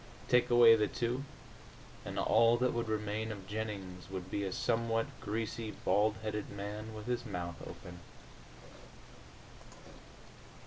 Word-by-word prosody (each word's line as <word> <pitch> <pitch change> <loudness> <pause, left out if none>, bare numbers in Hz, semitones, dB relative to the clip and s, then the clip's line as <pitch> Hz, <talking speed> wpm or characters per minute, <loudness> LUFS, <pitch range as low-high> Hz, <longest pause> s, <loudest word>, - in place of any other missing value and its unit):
Take 125 0 +4
away 120 -1 +8
the 105 -1 +2
two, 125 +5 -2 0.8
and - - -6
all 115 +1 +5
that 125 +1 +1
would 115 -1 -2
remain 110 +1 -1
of 100 -3 -7
Jennings 100 -4 -5
would 95 -1 -6
be 100 - -1
a 95 - -2
somewhat 115 +1 +1
greasy 110 +1 -3
bald 105 0 +2
headed 105 -1 -3
man 105 +2 -6
with 105 -1 -7
his 120 0 -1
mouth 85 -6 -5
open. 90 0 -9
110 Hz, 130 wpm, -33 LUFS, 100-115 Hz, 0.8 s, away